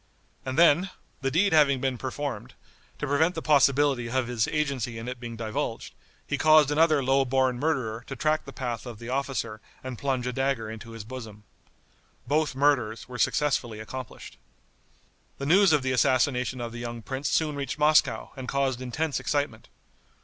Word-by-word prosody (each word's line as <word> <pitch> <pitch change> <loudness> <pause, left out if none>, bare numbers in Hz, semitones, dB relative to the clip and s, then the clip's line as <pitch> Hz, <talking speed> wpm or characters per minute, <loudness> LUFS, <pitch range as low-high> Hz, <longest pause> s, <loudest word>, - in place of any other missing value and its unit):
And 130 - -3
then, 170 +3 +5 0.3
the 135 - 0
deed 180 +6 +2
having 140 -4 +5
been 130 -2 -1
performed, 140 +2 -5 0.4
to - - -3
prevent 155 +5 +2
the 160 - -3
possibility 140 -4 +3
of 130 0 0
his 120 -3 0
agency 135 -6 -2
in 115 +2 -7
it 125 0 -5
being 120 -1 -7
divulged, 110 -1 -4 0.3
he 145 - -2
caused 155 -2 +6
another 155 -2 +3
low 135 +1 +3
born 130 -1 +1
murderer 125 -7 -1
to 135 - -5
track 155 +2 0
the 135 - -8
path 125 -3 -4
of 120 -3 -7
the 115 +2 -9
officer 130 -5 -2 0.2
and 130 -3 -6
plunge 130 -3 -1
a 125 - -2
dagger 135 -4 -1
into 115 +1 -9
his 115 -2 -7
bosom. 110 -3 -9 0.8
Both 145 +2 0
murders 130 -6 +1
were 125 -1 -8
successfully 120 -7 0
accomplished. 125 +2 -8 1.0
The 140 - -5
news 190 +4 +5
of 150 -3 +3
the 130 - 0
assassination 125 -1 +1
of 120 -1 -4
the 120 - -7
young 120 -1 -6
prince 135 +4 -3
soon 155 -2 +1
reached 140 +1 -4
Moscow, 150 +1 +3
and 130 -2 -7
caused 135 -2 0
intense 145 +4 -2
excitement. 145 -7 -2
130 Hz, 175 wpm, -27 LUFS, 120-145 Hz, 1.0 s, caused